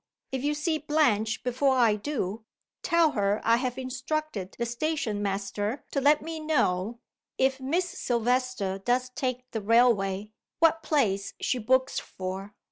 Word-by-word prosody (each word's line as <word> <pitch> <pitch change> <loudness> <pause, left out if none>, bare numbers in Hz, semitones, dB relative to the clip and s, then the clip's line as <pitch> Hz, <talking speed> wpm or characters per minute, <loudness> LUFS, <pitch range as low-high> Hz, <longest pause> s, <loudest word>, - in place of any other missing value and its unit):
If 265 -1 -3
you 295 +1 +1
see 310 +1 0
Blanche 245 -8 +1
before 260 +2 +2
I 235 -4 +4
do 215 -3 -3 0.4
tell 335 -3 +3
her 205 -2 +1
I 230 +1 +4
have 250 0 -2
instructed 260 -4 -3
the 235 - -1
station 240 -4 -2
master 205 +4 -2
to 275 - 0
let 295 +2 +4
me 325 0 -5
know 235 -9 0 0.4
(if 265 0 +2
Miss 320 +8 0
Silvester 245 - -1
does 250 +5 0
take 255 -1 -4
the 220 - -3
railway) 210 -3 +3 0.3
what 330 0 +4
place 205 -12 0
she 250 - 0
books 260 +4 +2
for. 190 +2 -6
250 Hz, 145 wpm, -27 LUFS, 210-285 Hz, 0.4 s, I